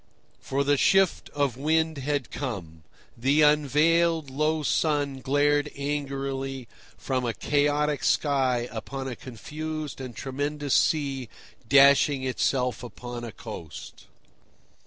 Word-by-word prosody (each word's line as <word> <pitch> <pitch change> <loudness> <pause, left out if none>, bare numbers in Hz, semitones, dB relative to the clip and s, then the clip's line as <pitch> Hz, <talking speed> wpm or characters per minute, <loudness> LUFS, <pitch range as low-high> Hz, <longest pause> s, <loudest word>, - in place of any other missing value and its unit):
For 140 +1 -1
the 145 0 +2
shift 195 +4 +3
of 140 -4 -1
wind 160 +1 +1
had 140 -2 -2
come. 90 - -5 0.3
The 140 +6 +3
unveiled, 150 +1 +3
low 155 +3 0
sun 145 -3 0
glared 145 +2 +2
angrily 135 -2 -3 0.3
from 130 -2 -2
a 115 -3 -2
chaotic 145 0 +1
sky 130 -4 +1
upon 135 +4 -5
a 125 - -4
confused 155 +5 -6
and 125 -3 -7
tremendous 145 +2 -3
sea 135 -6 +1 0.4
dashing 140 0 +5
itself 125 -1 0
upon 120 +1 -8
a 115 - -6
coast. 80 -5 -10
140 Hz, 115 wpm, -26 LUFS, 130-150 Hz, 0.4 s, dashing